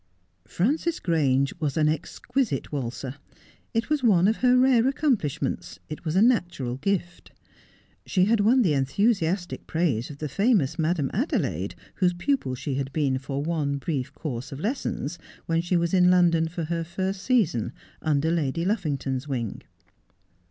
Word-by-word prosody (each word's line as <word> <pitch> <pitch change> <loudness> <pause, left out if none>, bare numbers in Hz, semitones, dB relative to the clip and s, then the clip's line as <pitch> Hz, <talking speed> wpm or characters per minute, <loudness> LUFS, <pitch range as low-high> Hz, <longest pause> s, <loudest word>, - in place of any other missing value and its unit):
Frances 305 - 0
Grange 140 -6 +1
was 150 -3 -1
an 155 -1 +3
exquisite 160 - -2
waltzer. 130 0 -4 0.5
It 230 +6 -1
was 300 -2 +2
one 190 -6 +5
of 220 - +2
her 250 0 +4
rare 250 -2 +4
accomplishments 265 - -1
— - - -40
it 155 - -7
was 155 +1 -1
a 195 - +5
natural 175 - +1
gift. 175 +2 -2 0.8
She 185 -1 +3
had 225 +2 +3
won 240 +5 +4
the 170 -7 +2
enthusiastic 175 - 0
praises 150 -9 0
of 145 - -9
the 150 - -4
famous 175 - +1
Madame 160 -3 0
Adelaide, 255 - -1 0.2
whose 180 -2 +3
pupil 175 - -1
she 135 +2 -4
had 135 0 -2
been 135 -3 0
for 135 +1 -4
one 150 -3 -1
brief 140 -3 -3
course 130 -3 -5
of 135 - -6
lessons 175 - -3 0.3
when 165 0 +1
she 175 +1 +1
was 170 +1 0
in 180 -1 +5
London 170 -3 +4
for 170 +1 -4
her 165 +1 -2
first 190 +3 -3
season, 195 - +1 0.3
under 155 +1 +1
Lady 165 0 0
Luffington's 145 - -1
wing. 120 -7 -3
165 Hz, 160 wpm, -26 LUFS, 140-200 Hz, 0.8 s, one